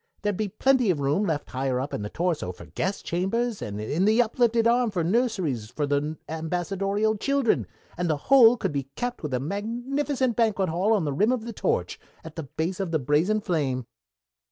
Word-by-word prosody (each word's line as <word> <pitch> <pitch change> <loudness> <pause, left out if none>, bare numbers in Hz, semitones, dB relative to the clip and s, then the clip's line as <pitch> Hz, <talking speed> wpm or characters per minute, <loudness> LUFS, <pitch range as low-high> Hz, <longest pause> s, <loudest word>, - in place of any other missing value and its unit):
There'd 205 -1 0
be 210 +1 -2
plenty 260 +1 +2
of 170 -5 +1
room 145 +9 +1
left 150 -3 -2
higher 130 0 -1
up 135 +3 -4
in - - -2
the 105 - -4
torso 170 - -1
for 85 -1 -12
guest 180 - -3
chambers, 210 +6 -1
and 105 0 -5
in 150 - 0
the 220 +3 +4
uplifted 235 -1 +2
arm 240 0 +3
for 180 -5 -1
nurseries 180 - 0
for 145 +4 -2
the 145 +2 -1
ambassadorial 195 +6 -1
children, 275 0 +1 0.3
and 175 -1 0
the 155 - +1
whole 245 - +6
could 195 -6 -2
be 140 -2 -3
capped 245 0 -3
with 150 - -4
a 125 - 0
magnificent 240 - -1
banquet 210 -5 +1
hall 185 +7 +2
on 200 -7 +1
the 145 - -1
rim 210 - +2
of 245 -3 -1
the 235 - -5
torch, - - -1 0.2
at 160 -1 -10
the 165 - -3
base 160 +6 -3
of 195 -3 -2
the 165 - +1
brazen 155 +10 +1
flame." 140 - -1
185 Hz, 205 wpm, -26 LUFS, 150-225 Hz, 0.3 s, whole